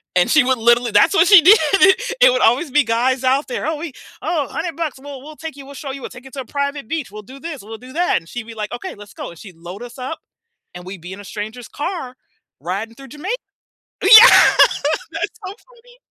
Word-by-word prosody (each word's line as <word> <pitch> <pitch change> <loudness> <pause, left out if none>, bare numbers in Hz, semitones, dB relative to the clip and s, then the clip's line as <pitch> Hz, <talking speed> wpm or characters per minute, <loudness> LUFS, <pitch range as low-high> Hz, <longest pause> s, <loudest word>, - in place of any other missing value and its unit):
and 180 - +3
she 290 -5 +5
would 260 0 +1
literally 235 +1 +2
that's 205 - +4
what 350 -2 +4
she 390 -2 +8
did 395 +8 +7 0.2
did. 375 +1 +6 0.3
It - - +7
would - - -1
always 255 +7 +2
be 295 +2 +3
guys 245 +3 0
out 265 +3 +1
there, 255 - -4
"Oh, 320 - -2
we 305 -3 -7 0.3
oh, 305 -5 -1
100 330 0 -5
bucks, 315 -6 -4
we'll 275 -1 -10
we'll 300 +2 -12
take 320 -3 -8
you, 275 - -11
we'll 280 - -12
show 275 0 -7
you, 270 0 -8
we'll - - -7
take 250 +1 -14
you 265 - -13
to 275 - -6
a 255 - -10
private 280 -2 -4
beach, 310 -9 -4
we'll 210 +1 -9
do 265 +6 -13
this, 315 -2 -7
we'll 220 +2 -10
do 255 +3 -14
that." 350 +2 +1
and 165 - -8
she'd 245 -2 -7
be 230 - -10
like, 210 -1 -5
"Okay, 240 - -7
let's 205 +1 -14
go." - - -8
and 170 - -14
she'd 190 -5 -13
load 175 +6 -10
us 245 +1 -11
up, 260 +6 -6 0.6
and 180 - -9
we'd 185 -2 -9
be 180 +2 -9
in 195 - -11
a - - -13
stranger's 220 +4 -7
car 295 -4 -5 0.5
riding 200 +8 -5
through 270 +1 -13
Jamai 300 - -6 0.7
yeah, 435 +4 +10 0.8
that's 330 +1 -3
so 430 -4 -11
funny. 485 +4 -15
265 Hz, 250 wpm, -19 LUFS, 225-325 Hz, 0.8 s, yeah